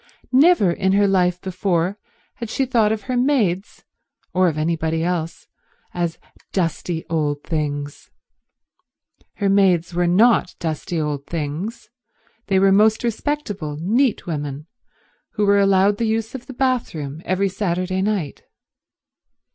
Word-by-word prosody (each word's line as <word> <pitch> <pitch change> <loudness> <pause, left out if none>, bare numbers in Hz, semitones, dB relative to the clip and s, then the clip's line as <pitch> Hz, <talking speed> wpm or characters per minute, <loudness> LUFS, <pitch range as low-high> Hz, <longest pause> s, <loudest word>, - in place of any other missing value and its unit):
Never 275 - +5
in 190 +2 0
her 200 +1 +4
life 180 -2 +2
before 185 0 -1 0.4
had 235 -2 -6
she 270 - 0
thought 230 -4 +2
of 215 -2 -2
her 250 +5 -3
maids, 230 -8 0 0.5
or 185 0 +3
of 155 -3 -1
anybody 160 0 -1
else, 170 -2 -3 0.5
as 170 -2 -2 0.3
dusty 170 -2 -2
old 150 -3 -1
things. 145 -2 -4 1.3
Her 200 - -1
maids 185 -3 +3
were 175 0 +1
not 210 +1 +3
dusty 160 +1 -3
old 145 -2 -3
things; 165 +7 -5 0.6
they 195 - +2
were 195 +1 +4
most 215 +4 +4
respectable, 215 - -3
neat 230 - +1
women, 145 -3 -4 0.7
who 210 - +1
were 200 0 +4
allowed 195 +1 +3
the 230 - +1
use 220 0 -1
of 260 -1 -8
the 265 - -8
bathroom 200 - -2
every 185 +2 0
Saturday 185 -1 -1
night. 195 -8 -2
185 Hz, 130 wpm, -21 LUFS, 165-215 Hz, 1.3 s, Never